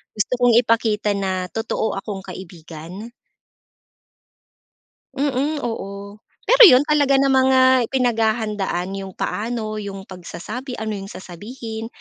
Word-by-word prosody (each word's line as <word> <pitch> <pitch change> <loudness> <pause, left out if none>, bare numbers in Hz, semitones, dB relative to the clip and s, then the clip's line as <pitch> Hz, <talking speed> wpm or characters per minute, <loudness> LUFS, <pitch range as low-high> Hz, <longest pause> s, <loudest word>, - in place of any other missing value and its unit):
gusto 210 +3 -1
kong 245 -2 +4
ipakita 220 -2 +1
na 190 -2 -2
totoo 225 0 -2
akong 195 -1 -7
kaibigan. 175 +2 -10 2.1
Mm. 285 +2 0
Oo. 200 -3 -6 0.3
Pero - - +6
'yon, 255 -6 +7
talaga 290 -3 +3
namang, 265 -1 +3
ah, 260 -1 +5
pinaghahandaan 220 -7 0
yung 195 -1 -8
paano, 215 -1 -3
yung 200 -2 -6
pagsasabi, 215 +8 -7
ano 220 0 -3
yung 195 0 -8
sasabihin 220 +5 -8
220 Hz, 110 wpm, -21 LUFS, 195-250 Hz, 2.1 s, yon